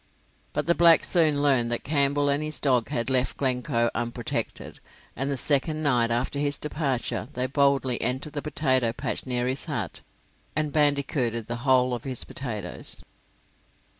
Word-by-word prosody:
But - - -1
the 170 - +3
blacks 170 0 +5
soon 155 -4 +3
learned 125 -5 +3
that 120 - -2
Campbell 145 0 +1
and 140 +1 +1
his 155 0 0
dog 125 -5 +1
had 120 +2 -1
left 130 -1 0
Glencoe 125 -2 0
unprotected, 120 0 -4 0.4
and 135 +3 -2
the 140 - -1
second 155 +4 +2
night 120 -5 +2
after 120 +4 -1
his 145 0 0
departure 130 -7 -2
they 125 +1 -1
boldly 135 -2 +1
entered 130 +5 -2
the 145 - -3
potato 130 -6 +1
patch 130 - -4
near 125 -1 0
his 130 +1 -1
hut, - - -4 0.5
and 150 -2 -1
bandicooted 140 -6 +1
the 120 +2 -4
whole 130 0 +3
of 120 - -4
his 130 -3 -3
potatoes. 115 -6 -5
135 Hz, 160 wpm, -26 LUFS, 120-145 Hz, 0.5 s, blacks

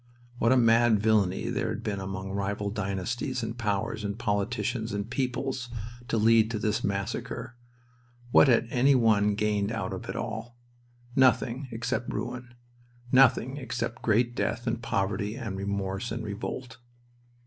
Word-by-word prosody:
What 115 - +3
a 130 - +5
mad 115 -2 +5
villainy 105 -3 +2
there - - -1
had 115 - -4
been 105 -4 -2
among 95 0 -5
rival 100 +1 -2
dynasties 110 +6 -2
and 115 0 -3
powers 110 -1 -2
and 100 0 -3
politicians 110 +1 -1
and 100 +1 -2
peoples 130 0 -2 0.4
to 120 - 0
lead 110 0 +5
to 115 - -2
this 105 0 -1
massacre! 100 +4 -3 0.8
What - - +7
had 120 -2 +4
any 135 +3 +4
one 105 -4 +3
gained 105 0 0
out 115 -5 -3
of - - -7
it - - -3
all? 120 +1 -5 0.6
Nothing 130 0 +3
except 115 +1 -2
ruin. 120 -1 -5 0.6
Nothing 130 0 +4
except 120 -3 -4
great 120 +2 +2
death 120 0 -1
and 115 -1 -1
poverty 100 -1 -1
and 100 -5 -5
remorse 100 +2 -3
and 115 0 -3
revolt. 115 +3 -5
115 Hz, 150 wpm, -28 LUFS, 100-120 Hz, 0.8 s, What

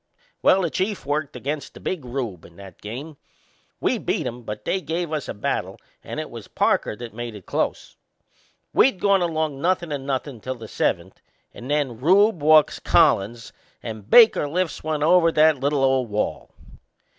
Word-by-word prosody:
Well, 190 0 +4
the 170 - -1
Chief 195 -2 -2
worked 145 +1 -2
against 145 0 -5
the - - -10
Big 180 -7 -4
Rube 120 -8 -5
in 85 - -16
that 95 -2 -13
game. 135 +8 -7 0.6
We - - 0
beat - - -2
'em, 120 +1 -5
but 105 -2 -7
they 190 - 0
give 165 +1 -3
us 150 -3 -3
a - - -3
battle 100 - -3 0.3
and - - -6
it - - -6
was - - -9
Parker - - 0
that 120 0 -9
made 120 -1 -6
it 100 - -12
close. - - -3 0.8
We'd 260 -8 +4
gone 200 -2 +3
along 155 -5 -1
nothin' 175 -1 0
and 140 -2 -4
nothin' 135 -3 -3
till 130 +3 -4
the 115 -2 -10
seventh, - - -2 0.3
and 125 - -10
then 145 -6 -1
Rube 190 - +4
walks 155 0 +5
Collins 120 -8 +2 0.3
and 110 -2 -8
Baker 225 -10 +6
lifts 175 0 -2
one 155 -1 -1
over 165 +1 +5
that 155 -2 +4
little 140 +1 0
old 130 -3 +2
wall. 105 +1 -2
145 Hz, 180 wpm, -23 LUFS, 120-165 Hz, 0.8 s, Baker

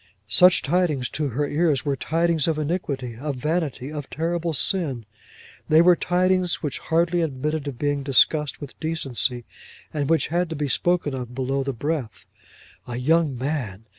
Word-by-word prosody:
Such 180 - +6
tidings, 155 -5 +1
to 150 -1 -1
her 140 +3 -1
ears, 150 -3 +1
were 140 -1 +1
tidings 165 +1 +1
of 160 -2 +1
iniquity, 145 -7 -3
of 145 +2 -3
vanity, 150 -1 -2
of 145 -3 -6
terrible 170 +1 -2
sin; 145 - 0 0.6
they 155 - +6
were 175 +1 +6
tidings 180 0 +1
which 150 - -3
hardly 170 +1 +1
admitted 150 0 -2
of 135 -4 -5
being 145 +1 0
discussed 135 +2 +3
with 140 -5 -10
decency, 135 -6 -2 0.5
and 145 -2 -1
which 165 -1 +2
had 175 +1 0
to 160 - -4
be 145 -1 -2
spoken 175 +1 +1
of 125 -2 -6
below 135 +1 -1
the 135 - -2
breath. 135 -3 -4 0.6
A 120 -1 -4
young 150 +1 +2
man! 120 -7 -3
150 Hz, 165 wpm, -24 LUFS, 135-165 Hz, 0.6 s, Such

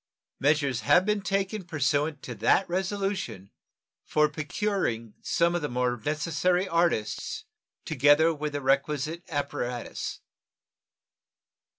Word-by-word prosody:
Measures 140 -3 +2
have 180 +1 +4
been 210 -1 +1
taken 195 +1 -1
pursuant 150 -2 0
to 125 - -5
that 115 - +3
resolution 190 - -2 0.5
for 150 0 +3
procuring 150 - -2
some 170 0 +2
of 175 - 0
the 150 - -2
most 125 -2 -1
necessary 165 +5 +1
artists, 170 -11 0 0.4
together 150 +3 +4
with 150 -1 -4
the 145 - -2
requisite 145 +4 0
apparatus. 135 -5 -3
150 Hz, 105 wpm, -27 LUFS, 135-180 Hz, 0.5 s, have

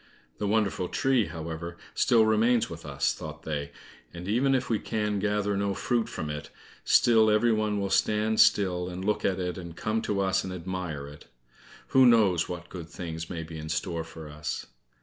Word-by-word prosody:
"The 105 - -1
wonderful 100 -4 +1
tree, 130 -5 +2
however, 85 +1 -6 0.2
still 115 -2 +4
remains 110 +1 +3
with 80 -2 -8
us," 70 -3 0
thought - - -8
they, 75 -2 -3 0.4
"and 90 +1 -8
even 130 +6 +2
if 125 -1 -1
we 110 -3 +1
can 105 -2 -1
gather 105 0 0
no 100 0 0
fruit 120 +1 0
from 80 - -4
it, 75 0 -6 0.3
still 110 -2 +5
every 110 +2 +4
one 105 -1 0
will 100 -1 -2
stand 110 +2 +2
still 95 -5 +4
and 90 +1 -6
look 105 0 0
at 95 - +1
it, 90 0 -3
and 85 -2 -8
come 110 +4 -1
to 105 -3 -1
us 95 -1 +1
and 95 - -5
admire 90 -5 -5
it. 75 +1 -13 0.6
Who 130 -1 +6
knows 100 -8 +4
what 85 0 -6
good 85 -3 -8
things 80 -1 -6
may 85 -3 -4
be 80 0 -8
in 80 0 -7
store 80 +1 -2
for 80 -1 -10
us?" 75 +1 -5
95 Hz, 190 wpm, -28 LUFS, 85-110 Hz, 0.6 s, Who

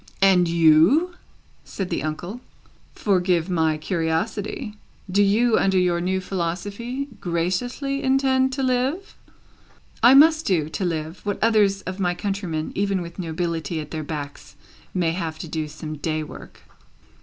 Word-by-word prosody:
"And 185 -3 +5
you?" 170 - +4 0.5
said 190 -2 -5
the - - -1
uncle. 175 +8 -5 0.5
"Forgive 180 -3 +1
my 160 -3 +1
curiosity; 180 +6 -2 0.4
do 200 +2 +3
you, 220 +4 +3
under 190 -1 +2
your 175 -1 +2
new 190 +2 0
philosophy, 200 +9 -4
graciously 195 - -2
intend 265 0 +2
to 270 0 -2
live?" 265 +10 -1 0.9
"I 250 +3 +7
must 315 +3 +6
do, 160 -6 +1
to 185 - -3
live, 160 0 -3
what 205 -1 -2
others 205 -3 +3
of 185 +1 -6
my 175 -2 0
countrymen, 180 -5 -3
even 195 -2 0
with 170 +2 -10
nobility 165 -2 -3
at 150 -1 -7
their 155 -1 -4
backs, 145 -2 -7 0.4
may 175 -3 0
have 165 -2 -4
to 165 - -7
do 155 -1 -3
some 155 0 -7
day 155 +1 -2
work." - - -12
185 Hz, 145 wpm, -23 LUFS, 165-215 Hz, 0.9 s, I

